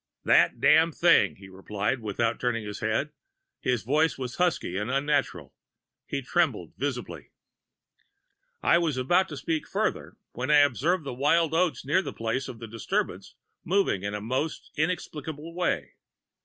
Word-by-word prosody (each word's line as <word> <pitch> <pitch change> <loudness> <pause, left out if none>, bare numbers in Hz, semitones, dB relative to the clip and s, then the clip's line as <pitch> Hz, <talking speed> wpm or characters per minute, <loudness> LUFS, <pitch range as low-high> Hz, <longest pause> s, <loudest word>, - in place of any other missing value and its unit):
"'That - - +4
Damned 160 +3 +5
Thing!' 165 - +4
he 95 - -13
replied, 100 +6 -3
without 115 +2 -1
turning 120 -3 -1
his 105 0 -6
head. 110 +7 -1 0.5
His 125 -4 0
voice 150 +6 +2
was 125 -2 -5
husky 175 - 0
and 105 +4 -2
unnatural. 140 +1 -1 0.5
He - - -3
trembled - - 0
visibly. - - -4 1.3
"I 170 - +5
was 160 -6 0
about 175 +9 +2
to 150 - -6
speak 160 +2 -2
further, - - -2
when 130 +4 -4
I 150 - +6
observed 150 +6 +2
the 135 -3 -5
wild 155 +5 +2
oats 170 -3 +1
near 150 +7 +3
the - - -6
place 115 +4 -2
of 120 - -8
the 115 0 -8
disturbance 115 -1 -3 0.3
moving 185 - +1
in 100 +1 -3
the 105 - -4
most 130 +8 -3
inexplicable 155 -1 -3
way. 175 0 -1
140 Hz, 155 wpm, -27 LUFS, 115-160 Hz, 1.3 s, I